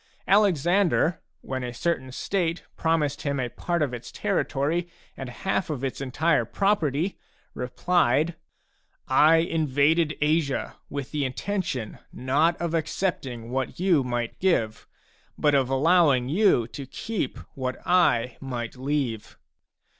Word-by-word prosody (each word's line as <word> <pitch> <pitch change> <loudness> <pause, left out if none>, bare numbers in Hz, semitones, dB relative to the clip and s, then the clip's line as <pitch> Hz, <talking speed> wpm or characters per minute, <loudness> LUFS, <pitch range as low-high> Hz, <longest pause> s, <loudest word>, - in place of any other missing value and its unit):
Alexander, 180 -3 +3 0.2
when 130 -1 -4
a 125 - -4
certain 130 -2 -1
state 175 +4 -1
promised 155 -3 0
him 140 -1 -1
a 125 -1 -1
part 170 +5 -1
of 135 -4 -2
its 120 0 -7
territory 170 -4 -1 0.3
and 135 -2 -6
half 190 +8 -2
its 135 -2 -3
entire 140 +1 +1
property, 170 - 0 0.3
replied: 150 +4 +1 0.4
" - - -43
I 155 +2 +6
invaded 160 -1 +2
Asia 150 -2 0
with 140 -2 -5
the 150 -2 -1
intention, 135 - -3
not 145 +7 +1
of 170 -1 -2
accepting 150 -8 -2
what 130 +3 -3
you 175 -6 +3
might 120 -2 -3
give, 115 - 0 0.5
but 150 -1 +2
of 135 -2 +3
allowing 140 -2 +3
you 160 - +3
to 140 +1 -8
keep 210 - -4 0.2
what 130 -1 -3
I 130 -10 +3
might 120 -4 -5
leave." 130 -4 -3
145 Hz, 125 wpm, -26 LUFS, 130-170 Hz, 0.5 s, I